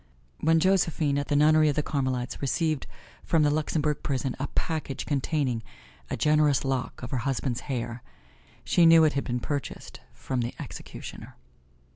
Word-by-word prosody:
When 160 +1 +3
Josephine 165 -6 +2
at 145 - -3
the 145 - 0
nunnery 155 +1 +5
of 145 - 0
the 150 - +1
Carmelites 130 -4 -2
received 155 +1 0 0.4
from 160 -2 +2
the 145 - +3
Luxembourg 150 0 0
prison 135 -2 -2
a 140 - -2
package 155 -5 -2
containing 140 -4 0 0.5
a - - -2
generous 150 -2 +3
lock 130 -2 -2
of 125 - -6
her 130 - 0
husband's 130 -1 -1
hair, 120 -2 -3 0.6
she 170 -1 +4
knew 165 0 +8
it 155 - +3
had 140 - -1
been 125 0 -1
purchased 145 +3 -5
from 130 -2 -3
the 120 - -4
executioner. - - -9
145 Hz, 160 wpm, -27 LUFS, 130-155 Hz, 0.6 s, knew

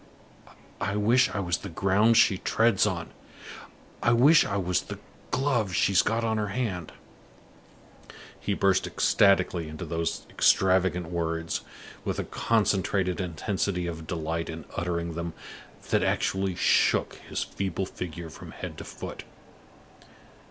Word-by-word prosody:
"I 100 0 -1
wish 115 +5 +4
I - - -3
was 90 -4 0
the 100 - -7
ground 100 +6 +3
she 95 - +5
treads 110 -3 +2
on! 85 -4 -3 0.9
I 120 - +3
wish 145 +7 +6
I 100 - -2
was 90 -2 0
the - - -8 0.3
glove 120 -9 0
she's 95 -1 +4
got 115 +1 0
on 110 -1 0
her 105 - -1
hand!" 95 -6 -3 1.5
He 100 - -1
burst 95 -1 +2
ecstatically 90 -4 +2
into 80 +3 -7
those 85 +1 -3
extravagant 95 -2 +2
words, 80 -1 -2 0.4
with - - -2
a - - -1
concentrated 100 -4 0
intensity 90 +1 -2
of 80 -2 -6
delight 80 -1 -3
in 80 -2 -7
uttering 85 -1 -2
them 85 0 -4 0.6
that - - +3
actually 95 -1 0
shook - - +2
his - - -1
feeble 95 -1 -3
figure 85 -3 -7
from - - -11
head - - -7
to - - -6
foot. - - -8
95 Hz, 135 wpm, -27 LUFS, 85-105 Hz, 1.5 s, wish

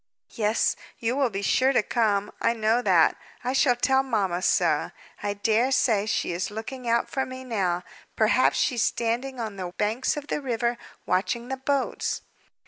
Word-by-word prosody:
"Yes, 215 0 +1 0.2
you 235 +2 -1
will 275 -3 +2
be 200 -1 -4
sure 260 +6 +3
to 230 - +3
come; 210 -4 +1
I - - +3
know 225 +1 +1
that. - - +4 0.3
I 250 +1 -1
shall 265 -2 +4
tell 265 +2 +3
mamma 200 -9 -1
so. - - +2 0.3
I 205 0 -2
dare 225 +5 +2
say 215 -5 +2
she 210 - 0
is 175 +4 -2
looking 235 +4 -6
out 235 0 +2
for 265 - -1
me 255 0 -7
now. 190 -8 -1 0.3
Perhaps 225 +4 +3
she's 245 -5 +1
standing 240 +4 -1
on 215 -3 -4
the 180 -2 -5
banks 220 +7 0
of 295 - -5
the 295 - -3
river, 240 -2 -1 0.3
watching 235 +7 -1
the 265 - -2
boats." 275 0 -1
235 Hz, 175 wpm, -26 LUFS, 210-255 Hz, 0.3 s, that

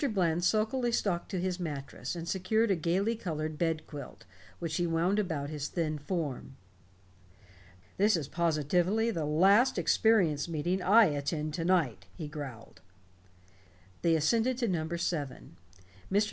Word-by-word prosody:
Bland 175 -2 +1
sulkily 225 +5 +1
stalked 190 -6 -1
to 190 - -2
his 185 0 -2
mattress 150 -1 -5
and 170 -1 -6
secured 205 +5 +1
a - - +3
gaily 185 +7 0
colored 155 -6 -4
bed 165 -2 0
quilt, 145 -4 -10 0.3
which 165 -2 -3
he 175 - +1
wound 170 +5 +1
about 160 -7 -2
his 150 -2 -3
thin 155 -3 -2
form. 145 -4 -4 1.4
"This 205 -1 +4
is 150 -4 -4
positively 170 +8 +1
the 165 -7 -2
last 195 - +4
experience 175 -10 +2
meeting 175 +4 -1
I 215 +5 +6
attend 150 0 -2
to 165 0 -3
night," 135 - +1
he 155 - -6
growled. 140 -7 -8 1.2
They 165 -1 +3
ascended 230 +11 +2
to 245 -2 0
number 170 -2 -1
seven. 150 -6 -4 0.5
Mr. 200 - +4
170 Hz, 145 wpm, -30 LUFS, 150-195 Hz, 1.4 s, I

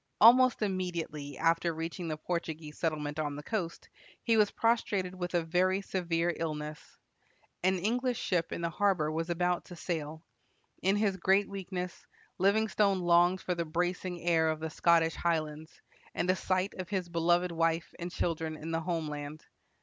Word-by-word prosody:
Almost 245 +1 +7
immediately 170 -7 -3
after 165 +1 +2
reaching 165 +2 -4
the 155 -1 -3
Portuguese 160 -2 -4
settlement 150 -2 -2
on 145 -2 -2
the 145 - -7
coast, 180 -5 -3 0.4
he 230 - +3
was 210 -2 +5
prostrated 205 -5 0
with 180 -1 -4
a 170 - +2
very 185 +3 +2
severe 175 -3 0
illness. 150 -2 -5 0.6
An 185 +1 +2
English 240 +6 0
ship 175 -3 0
in - - -3
the 170 - 0
harbor 180 -5 +1
was 165 +2 -2
about 175 +1 0
to 175 - -10
sail. 160 -2 -4 0.6
In 195 +2 +3
his 205 -2 +1
great 190 +3 +3
weakness, 185 -2 -6 0.3
Livingstone 200 -1 +3
longed 175 +1 +4
for 180 - -1
the 170 -1 -1
bracing 175 +2 -2
air 165 -2 +3
of 155 -1 -1
the 160 0 -4
Scottish 165 0 +3
highlands, 155 -2 -2 0.4
and 175 - 0
a - - +1
sight 185 +1 0
of 185 - -5
his 190 -4 -1
beloved 175 +1 +2
wife 165 0 0
and 175 +1 -4
children 160 -2 -2
in 160 +2 -6
the 165 0 0
home 165 -2 -2
land. 150 +1 -6
175 Hz, 165 wpm, -31 LUFS, 160-185 Hz, 0.6 s, Almost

